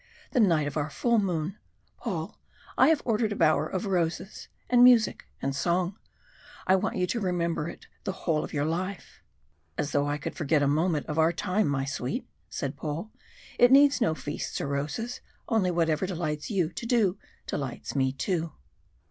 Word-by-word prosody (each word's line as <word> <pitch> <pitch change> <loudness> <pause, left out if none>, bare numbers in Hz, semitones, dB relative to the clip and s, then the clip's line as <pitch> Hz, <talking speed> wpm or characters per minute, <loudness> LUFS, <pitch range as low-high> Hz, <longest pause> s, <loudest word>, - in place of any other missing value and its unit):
The 255 - +1
night 165 -9 +4
of 145 +1 -3
our 150 0 -1
full 235 +4 +2
moon! 180 -1 -2 0.4
Paul, - - -4 0.4
I - - +6
have 320 -2 +3
ordered 220 -2 +1
a - - -1
bower 155 -3 +3
of 185 +4 -3
roses 180 0 -2 0.2
and 245 -1 +5
music 245 -3 +5 0.2
and 135 0 -1
song. 175 +5 0 0.7
I 190 - +5
want 190 +1 -1
you 180 - +1
to 230 +6 -2
remember 170 -4 -1
it - - -11 0.2
the 195 - -1
whole 155 -3 +2
of - - -7
your 145 -1 0
life." 180 +4 -4 0.6
"As 145 - -1
though 145 0 +1
I 145 0 -1
could 145 - -5
forget 155 -2 +1
a - - +3
moment 155 +1 +1
of 155 0 -2
our 160 +1 +5
time, 200 +4 0
my 135 -1 0
sweet," 135 -2 -3 0.2
said 140 +1 -4
Paul. 160 +8 -4 0.5
"It 245 +1 +7
needs 280 0 +6
no 185 -9 +2
feasts 145 -1 -4
or 140 - -3
roses 155 - -3 0.3
only 220 -6 +2
whatever 165 0 +1
delights 155 -5 -3
you 185 -7 +1
to 210 - -7
do, 220 -6 +2 0.3
delights 135 -1 -4
me 130 -1 +2
too." 165 +3 -2
170 Hz, 180 wpm, -28 LUFS, 150-205 Hz, 0.7 s, It